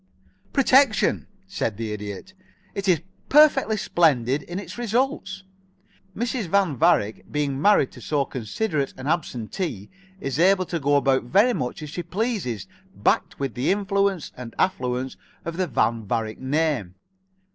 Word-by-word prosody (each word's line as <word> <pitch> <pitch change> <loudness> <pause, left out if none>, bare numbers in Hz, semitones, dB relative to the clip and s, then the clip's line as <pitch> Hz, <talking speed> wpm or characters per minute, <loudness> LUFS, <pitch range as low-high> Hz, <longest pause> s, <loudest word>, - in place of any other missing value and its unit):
"Protection," 270 -3 +3 0.2
said 115 - -2
the 110 -2 -3
Idiot. 105 - -7 0.4
"And - - -33
it 200 0 -2
is 170 -5 +3 0.3
perfectly 275 -7 +5
splendid 140 - +2
in 175 +5 -7
its 200 - -7
results. 235 -4 -1 0.7
Mrs. 235 -2 -2
Van 190 -4 +2
Varick, 110 -3 +1
being 145 -2 -1
married 205 -9 +4
to - - -13
so 145 -3 0
considerate 135 - -2
an 130 - -8
absentee, 130 - -3 0.3
is 135 -1 -3
able 185 +1 +4
to 170 -1 -3
go 145 0 +2
about 135 -3 +2
very 205 - +4
much 125 - -3
as 150 - -7
she 175 - -4
pleases 180 - -2 0.3
backed - - +1
with 135 -4 -2
the 125 +6 -1
influence 200 -3 0
and 125 -2 -9
affluence 130 -6 -1 0.3
of 170 0 -4
the 185 -1 0
Van 115 -5 +1
Varick 110 0 -2
name. 135 - -1
155 Hz, 145 wpm, -24 LUFS, 125-195 Hz, 0.7 s, perfectly